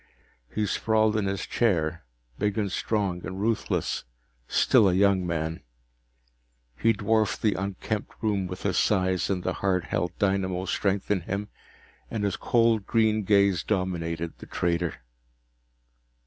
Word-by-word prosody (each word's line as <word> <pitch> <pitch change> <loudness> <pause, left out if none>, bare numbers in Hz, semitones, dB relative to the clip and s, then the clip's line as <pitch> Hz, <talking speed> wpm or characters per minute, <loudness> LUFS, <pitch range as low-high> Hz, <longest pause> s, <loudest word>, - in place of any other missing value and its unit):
He 105 - +1
sprawled 110 +1 +2
in 105 -2 +1
his 100 0 -2
chair, 85 -8 0 0.4
big 105 +1 0
and 100 -3 0
strong 100 -4 -1
and 95 +2 -5
ruthless, 110 +2 -1 0.4
still 100 - +4
a - - +1
young 95 -2 +3
man. 80 -1 -2 1.1
He 115 - +3
dwarfed 110 0 +1
the 105 -2 +3
unkempt 100 +2 -3
room 105 -4 0
with 90 +1 -7
his 100 -3 +1
size 95 -4 +1
and 95 -2 -1
the - - -1
hard 95 -2 +1
held 90 -1 -2
dynamo 95 -2 0
strength 100 +1 -1
in 100 -3 +2
him, 100 +4 -4 0.6
and 110 -3 -3
his 100 - 0
cold 115 -3 +2
green 110 -2 +2
gaze 100 -4 +4
dominated 85 -3 -2
the - - -10
trader. 85 -6 -1
100 Hz, 140 wpm, -27 LUFS, 90-105 Hz, 1.1 s, still